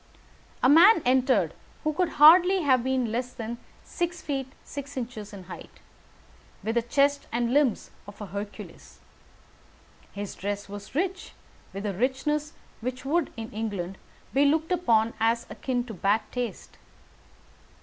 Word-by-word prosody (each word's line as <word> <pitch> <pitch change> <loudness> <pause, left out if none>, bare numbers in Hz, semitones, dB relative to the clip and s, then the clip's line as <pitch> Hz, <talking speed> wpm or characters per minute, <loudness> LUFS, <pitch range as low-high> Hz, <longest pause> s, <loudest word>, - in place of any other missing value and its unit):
A - - +6
man 335 +6 +7
entered 255 +1 +3 0.3
who 310 0 0
could 360 +2 0
hardly 355 +5 +7
have 260 -4 +3
been 260 -3 0
less 245 +2 -3
than 235 0 -6 0.2
six 350 0 -3
feet 275 -4 -3 0.2
six 280 -1 -8
inches 230 -4 -5
in 200 -3 -9
height, 180 - -11 0.8
with 225 - -1
the 235 - +2
chest 280 +4 +1
and 235 +1 0
limbs 280 -6 +2 0.2
of 205 - -12
a 210 - -5
Hercules. 200 +2 -8 1.1
His 205 -1 -6
dress 205 +1 -4
was 205 +4 -10
rich 370 +3 -2 0.4
with 195 +2 -6
a 200 - -1
richness 290 - -1 0.3
which 255 +3 -5
would, 320 +2 +1
in 225 0 -6
England, 200 -4 -4 0.3
be 275 - +4
looked 315 +4 +2
upon 230 -11 +2
as 230 +1 +1
akin 250 -2 -2
to 235 -2 -8
bad 200 +3 +1
taste. 245 -2 -5
250 Hz, 145 wpm, -27 LUFS, 220-295 Hz, 1.1 s, man